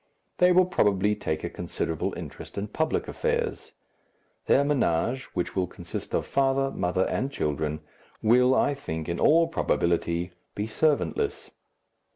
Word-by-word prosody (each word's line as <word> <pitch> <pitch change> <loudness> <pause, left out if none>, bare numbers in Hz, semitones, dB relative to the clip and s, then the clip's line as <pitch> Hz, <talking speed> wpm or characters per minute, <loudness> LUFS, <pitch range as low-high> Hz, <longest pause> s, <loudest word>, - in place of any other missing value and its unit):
They 180 0 +6
will 185 +1 +6
probably 105 - +2
take 80 -6 -3
a - - -2
considerable 80 -2 -3
interest - - -9
in 100 +1 -3
public 160 +8 -1
affairs. 475 -1 -2 0.7
Their 140 - +5
ménage, 130 - +1
which 90 - -2
will 95 -2 +1
consist - - -6
of - - 0
father, 135 0 +1
mother, 90 +1 0
and 135 +2 -1
children, 75 - -2 0.4
will, 125 +3 +5
I 145 - +3
think, 80 - -5
in 85 - -2
all 165 +2 +5
probability, 85 - 0 0.2
be 105 - -2
servantless. 155 - 0
120 Hz, 140 wpm, -27 LUFS, -, 0.7 s, They